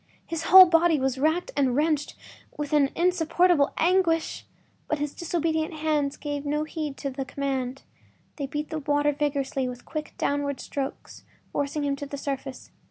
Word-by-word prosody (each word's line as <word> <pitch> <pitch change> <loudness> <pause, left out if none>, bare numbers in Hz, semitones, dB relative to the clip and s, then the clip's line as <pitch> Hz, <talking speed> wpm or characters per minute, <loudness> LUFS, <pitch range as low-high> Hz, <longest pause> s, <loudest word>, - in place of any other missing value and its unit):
His 330 -1 -4
whole 375 0 +10
body 330 -2 +3
was 265 0 -1
racked 315 +5 +1
and 265 -3 +2
wrenched 300 0 0 0.4
with 295 0 -4
an 285 -2 +4
insupportable 345 -3 +3
anguish! 335 -2 +1 0.4
But 305 - 0
his 295 0 -3
disobedient 320 -2 -1
hands 300 -2 0
gave 290 -1 -4
no 300 +1 -1
heed 310 -3 -5
to 275 - -4
the 270 +1 -4
command. 265 -1 -3 0.5
They 280 -3 -3
beat 295 +3 -4
the 315 - -2
water 290 0 +1
vigorously 280 -3 -1
with 245 0 -9
quick, 305 -1 -6
downward 285 -1 -1
strokes, 275 -1 -6 0.3
forcing 285 +1 -2
him 280 -1 0
to 285 - -6
the 285 - -6
surface. 275 -1 -5
295 Hz, 165 wpm, -26 LUFS, 280-320 Hz, 0.5 s, whole